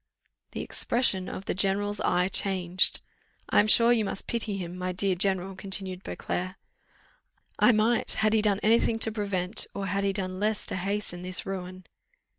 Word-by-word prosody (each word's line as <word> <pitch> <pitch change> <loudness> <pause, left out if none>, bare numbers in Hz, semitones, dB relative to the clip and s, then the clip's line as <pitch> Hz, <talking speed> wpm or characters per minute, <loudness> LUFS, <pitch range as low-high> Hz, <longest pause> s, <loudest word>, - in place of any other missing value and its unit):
The - - -4
expression 210 -6 0
of 195 - -7
the - - -1
general's 200 +2 0
eye 180 +1 +2
changed. 185 -2 +1 0.5
"I - - +5
am 210 - +4
sure 230 +2 +7
you 225 -2 +1
must 195 -1 -4
pity 220 -4 -2
him, 175 -2 -6
my 185 0 -3
dear 190 +1 +2
general," 190 +1 +1
continued 190 -1 -3
Beauclerc. 185 -1 -4 1.0
"I - - +6
might, 225 +1 +2
had 215 0 +1
he 220 - +3
done 205 -2 +1
any 225 +2 +5
thing 225 - 0
to 225 0 0
prevent, 200 -2 -2
or 200 - -3
had 195 +1 -1
he 200 - +1
done 185 -2 -4
less 215 0 -1
to - - -2
hasten, 190 -1 -3
this 185 0 -3
ruin." 185 -1 -6
195 Hz, 180 wpm, -27 LUFS, 185-210 Hz, 1.0 s, sure